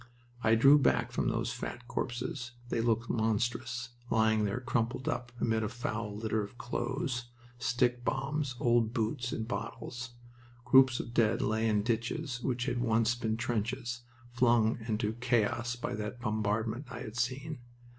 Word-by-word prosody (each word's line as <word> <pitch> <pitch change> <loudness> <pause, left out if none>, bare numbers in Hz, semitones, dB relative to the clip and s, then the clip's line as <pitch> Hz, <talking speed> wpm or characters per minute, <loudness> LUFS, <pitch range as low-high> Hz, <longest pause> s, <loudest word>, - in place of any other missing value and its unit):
I 110 0 +5
drew 135 +6 +7
back - - +2
from - - 0
those - - 0
fat 120 0 -6
corpses. 120 0 -3 0.2
They 115 - +1
looked 115 0 +1
monstrous, 120 +1 0 0.2
lying 110 -1 +3
there 105 +4 -1
crumpled 120 0 -1
up, 120 0 -2
amid 115 -1 +1
a 105 - -1
foul 115 -3 -3
litter 110 0 0
of 100 +5 -9
clothes, 120 0 -2 0.3
stickbombs, 130 +3 0
old 120 -1 +2
boots, 120 +2 -1
and 110 -1 -3
bottles. 120 0 -5 0.5
Groups 130 0 +6
of 120 - -5
dead 110 -2 +3
lay 110 +1 +1
in 105 -2 +2
ditches 120 +2 -1
which 125 -1 -1
had 125 -3 -1
once 115 0 +3
been 110 -2 -1
trenches, 120 +2 -2 0.3
flung 120 -2 +3
into 110 -1 0
chaos 120 0 +1
by 120 - -4
that 105 +3 -4
bombardment 110 +3 -1
I - - -6
had 110 - -7
seen. 130 +5 -2
120 Hz, 150 wpm, -31 LUFS, 110-125 Hz, 0.5 s, drew